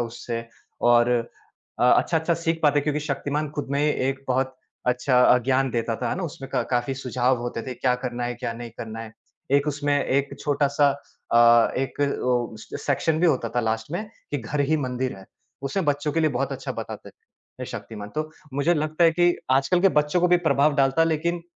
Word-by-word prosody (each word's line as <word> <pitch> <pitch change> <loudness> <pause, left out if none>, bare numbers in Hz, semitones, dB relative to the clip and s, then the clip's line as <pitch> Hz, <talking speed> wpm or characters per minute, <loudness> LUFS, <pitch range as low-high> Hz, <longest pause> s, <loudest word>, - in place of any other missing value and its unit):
उससे 115 0 -4 0.5
और 120 0 +5 0.7
अ, - - +4
अच्छा-अच्छा 160 +6 +3
सीख 165 0 -2
पाते 145 -1 +4
क्योंकि 150 +1 -1
शक्तिमान 145 +1 -2
खुद 145 - -4
में 140 0 +1
एक 135 -2 0
बहुत 130 +1 0 0.3
अच्छा 125 +1 +2
अ, 125 - +6
ज्ञान 130 +2 +1
देता 115 -1 -1
था - - 0
ना 190 - -4
उसमें 135 -5 -6
क 125 -3 0
काफ़ी 125 +2 0
सुझाव 130 -1 0
होते 120 -1 -4
थे, 130 0 -6
क्या 125 +1 +1
करना 125 -1 -4
है 120 0 -2
क्या 120 -1 -4
नहीं 120 0 -8
करना 115 0 -6
है? 115 -1 -9 0.4
एक 140 +1 +3
उसमें 145 0 0
एक 140 +1 0
छोटा-सा 145 0 +2 0.4
अ, 120 0 +6
एक 135 +2 -3 0.2
ओ, 120 -3 0
सेक्शन 145 +7 -1
भी 175 - +4
होता 130 -7 +1
था - - +4
लास्ट 110 +1 -2
में 185 +5 -2 0.3
कि 145 - 0
घर 130 +5 -3
ही 155 - +4
मंदिर 130 -4 -2
है, 95 - -12 0.4
उसमें 140 +7 -1
बच्चों 145 +1 0
के 165 - +1
लिए 155 -1 +2
बहुत 135 +1 -2
अच्छा - - -5
बताते - - -7
थे - - -14
शक्तिमान। 105 -2 -7
तो 155 0 -2 0.2
मुझे 145 +5 +2
लगता 155 +2 +1
है 165 - +7
कि 175 +1 +3 0.2
आजकल 140 +7 +3
के 195 - +6
बच्चों 150 +4 0
को 180 - +3
भी 180 - +6
प्रभाव 140 +2 +3
डालता 135 +3 +3
लेकिन 170 +2 -1
135 Hz, 200 wpm, -24 LUFS, 120-150 Hz, 0.7 s, है